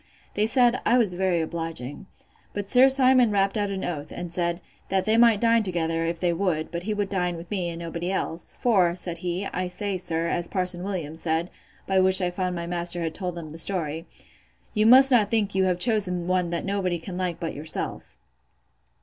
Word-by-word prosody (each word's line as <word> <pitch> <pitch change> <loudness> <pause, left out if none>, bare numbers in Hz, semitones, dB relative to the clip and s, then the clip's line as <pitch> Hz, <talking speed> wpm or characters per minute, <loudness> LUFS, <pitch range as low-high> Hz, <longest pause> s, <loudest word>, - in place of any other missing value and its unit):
They 210 +1 +1
said, 245 +1 +3
I 240 - +3
was 215 -7 +2
very 180 -2 0
obliging. 165 -2 -5 0.5
But 205 -1 -5
Sir 260 +1 +7
Simon 260 -2 +4
rapt 200 0 +1
out 205 -2 -1
an 195 -1 -4
oath, 150 -4 -4
and 175 -1 -6
said, 170 0 -1 0.3
That 190 -1 0
they 220 0 +2
might 230 -2 +5
dine 230 0 +3
together, 165 -4 -1
if 170 0 -3
they 175 -1 +1
would; 165 -3 -1
but 170 - -4
he 210 +4 -2
would 205 -1 -1
dine 180 -3 -2
with 170 +3 -11
me, 185 -4 -1
and 165 - -6
nobody 170 +1 -4
else: 170 -3 -3
for, 185 -8 +2
said 175 -2 -4
he, 180 +2 -3
I 185 -1 -3
say, 190 +1 -3
sir, 165 -2 -2
as 175 0 -1
Parson 180 -2 0
Williams 165 -5 -5
said, 165 +2 -1 0.3
(by 190 -1 +2
which 190 0 +5
I 180 -1 -1
found 180 0 -2
my 170 0 -4
master 175 0 -1
had 160 -1 -3
told 180 0 -4
them 160 -3 -8
the 160 - -6
story,) 165 -3 0 0.7
You 215 0 +3
must 265 +3 +8
not 220 -5 +4
think 215 -3 0
you 190 0 +2
have 180 -1 +1
chosen 180 -4 0
one 180 -1 0
that 170 -1 -3
nobody 190 -3 -1
can 180 +2 -8
like 180 -2 -3
but 165 - -4
yourself. 155 +2 -4
180 Hz, 210 wpm, -25 LUFS, 170-200 Hz, 0.7 s, must